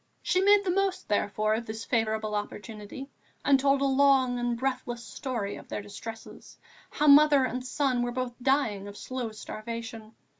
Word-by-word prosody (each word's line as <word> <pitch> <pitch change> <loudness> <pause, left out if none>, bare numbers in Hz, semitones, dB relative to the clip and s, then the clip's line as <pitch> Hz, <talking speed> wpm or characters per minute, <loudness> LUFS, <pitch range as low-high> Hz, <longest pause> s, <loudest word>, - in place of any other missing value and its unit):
She 365 - +2
made 405 +1 +5
the 370 - 0
most, 390 0 0
therefore, 210 +1 +1
of 225 +1 -3
this 220 +1 -6
favourable 220 -2 0
opportunity 210 +5 -6 0.3
and 275 -1 +5
told 275 0 +2
a - - +2
long 265 -2 +3
and 240 -1 -1
breathless 250 -2 -3
story 220 -1 -4
of - - -12
their 205 - -4
distresses, 225 +2 -10 0.3
how 300 - -1
mother 290 -1 +7
and 255 0 -3
son 255 -1 0
were 240 0 -1
both 250 0 -3
dying 245 -7 +1
of 205 0 -9
slow 255 -3 -4
starvation. 225 +1 -7
245 Hz, 165 wpm, -28 LUFS, 220-275 Hz, 0.3 s, mother